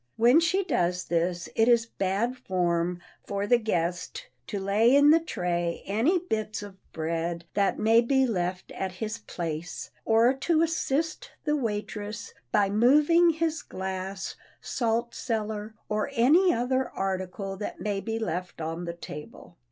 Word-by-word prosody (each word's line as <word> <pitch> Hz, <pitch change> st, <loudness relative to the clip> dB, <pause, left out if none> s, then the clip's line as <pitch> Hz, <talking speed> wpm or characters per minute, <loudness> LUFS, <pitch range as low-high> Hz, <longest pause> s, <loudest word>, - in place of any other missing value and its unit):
When 240 Hz, +7 st, +6 dB
she 355 Hz, +4 st, +2 dB
does 180 Hz, -, 0 dB
this 175 Hz, +1 st, -1 dB
it 225 Hz, -, +4 dB
is 235 Hz, -1 st, +5 dB
bad 205 Hz, +3 st, -1 dB
form 175 Hz, -6 st, 0 dB, 0.3 s
for 200 Hz, 0 st, -1 dB
the 240 Hz, +3 st, +4 dB
guest 175 Hz, -5 st, -2 dB, 0.2 s
to 205 Hz, -, -3 dB
lay 210 Hz, +6 st, +4 dB
in 285 Hz, +1 st, +7 dB
the 325 Hz, -, +6 dB
tray 175 Hz, -, -2 dB
any 230 Hz, -, +2 dB
bits 215 Hz, -, -3 dB
of 200 Hz, -2 st, -9 dB, 0.2 s
bread 165 Hz, +1 st, -3 dB
that 200 Hz, -1 st, +1 dB
may 225 Hz, +2 st, +5 dB
be 265 Hz, +2 st, +3 dB
left 185 Hz, -5 st, -2 dB
at 190 Hz, -1 st, -4 dB
his 215 Hz, +4 st, -4 dB
place 165 Hz, -5 st, -5 dB
or 230 Hz, +3 st, +4 dB
to 315 Hz, +4 st, +2 dB
assist 325 Hz, -, -1 dB
the 300 Hz, -1 st, +1 dB
waitress 210 Hz, -3 st, -4 dB, 0.2 s
by 205 Hz, -2 st, +3 dB
moving 295 Hz, -, +5 dB
his 320 Hz, -1 st, 0 dB
glass, 190 Hz, +1 st, -5 dB, 0.2 s
salt 235 Hz, -1 st, -1 dB
cellar, 220 Hz, -2 st, -3 dB
or 215 Hz, +5 st, -1 dB
any 310 Hz, +10 st, +5 dB
other 255 Hz, +1 st, 0 dB
article 195 Hz, 0 st, -3 dB
that 205 Hz, -, -5 dB
may 205 Hz, -2 st, -1 dB
be 225 Hz, +1 st, -3 dB
left 180 Hz, -6 st, -4 dB
on 165 Hz, +2 st, -4 dB
the 170 Hz, -, -4 dB
table. 150 Hz, +1 st, -10 dB
215 Hz, 150 wpm, -27 LUFS, 185-250 Hz, 0.3 s, in